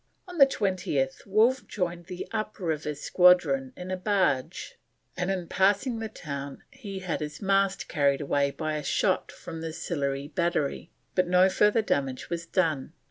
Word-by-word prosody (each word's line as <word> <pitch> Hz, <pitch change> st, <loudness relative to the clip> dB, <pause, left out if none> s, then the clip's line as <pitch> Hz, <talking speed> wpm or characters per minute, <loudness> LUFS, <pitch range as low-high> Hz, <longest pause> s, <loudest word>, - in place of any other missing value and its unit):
On 355 Hz, -2 st, -8 dB
the 275 Hz, -, +9 dB
20th 180 Hz, -, -1 dB
Wolfe 225 Hz, +6 st, +3 dB
joined 175 Hz, -3 st, -3 dB
the 180 Hz, -1 st, -6 dB
up 215 Hz, -1 st, -3 dB
river 155 Hz, -4 st, -2 dB
squadron 150 Hz, -5 st, +4 dB
in 180 Hz, +1 st, -6 dB
a -, -, 0 dB
barge, 185 Hz, -9 st, -1 dB, 0.4 s
and 180 Hz, +1 st, -2 dB
in 185 Hz, -2 st, -1 dB
passing 205 Hz, +7 st, +2 dB
the 220 Hz, -1 st, -4 dB
town 140 Hz, -5 st, -7 dB, 0.4 s
had 180 Hz, -, -2 dB
his 150 Hz, -1 st, -5 dB
mast 195 Hz, -1 st, +1 dB
carried 140 Hz, -3 st, +2 dB
away 140 Hz, -1 st, +1 dB
by 155 Hz, +2 st, -3 dB
a 150 Hz, -, -5 dB
shot -, -, 0 dB
from 165 Hz, -1 st, -8 dB
the 165 Hz, 0 st, -4 dB
Sillery 140 Hz, -4 st, -3 dB
Battery, 170 Hz, -3 st, -1 dB, 0.2 s
but 185 Hz, -1 st, +2 dB
no 180 Hz, +1 st, +5 dB
further 210 Hz, +3 st, +3 dB
damage 135 Hz, -8 st, -2 dB
was 170 Hz, 0 st, -3 dB
done. 160 Hz, -6 st, 0 dB
175 Hz, 160 wpm, -27 LUFS, 145-195 Hz, 0.4 s, the